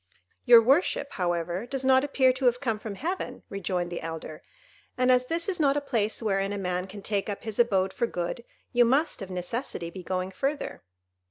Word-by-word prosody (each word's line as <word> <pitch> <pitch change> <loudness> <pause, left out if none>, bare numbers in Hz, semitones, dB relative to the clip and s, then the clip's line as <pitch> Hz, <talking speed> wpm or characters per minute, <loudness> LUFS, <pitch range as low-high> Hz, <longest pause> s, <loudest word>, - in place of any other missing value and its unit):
"Your 235 -1 +9
worship, 280 +2 +2
however, 175 +3 -2
does 270 +1 -3
not 260 0 +5
appear 265 -3 +3
to 260 +1 -3
have 245 0 +3
come 225 -5 -1
from 215 -2 -6
heaven," 350 - -4
rejoined 180 -3 -2
the 175 - -4
elder, 160 -1 -6 0.6
"and 255 0 +4
as 250 0 +3
this 335 +3 -1
is 375 -3 -2
not 285 -2 +3
a - - +3
place 225 -6 -1
wherein 195 -2 0
a 205 - -3
man 180 -1 -2
can 200 +1 -10
take 205 0 -1
up 200 - -5
his 220 -1 -5
abode 195 -5 +3
for 235 - 0
good, 175 +4 -4 0.3
you 245 0 +6
must, 265 +2 +1
of 195 - -6
necessity, 180 -1 -4
be 185 - -8
going 185 +1 -3
further." 275 +9 -3
220 Hz, 200 wpm, -27 LUFS, 185-260 Hz, 0.6 s, Your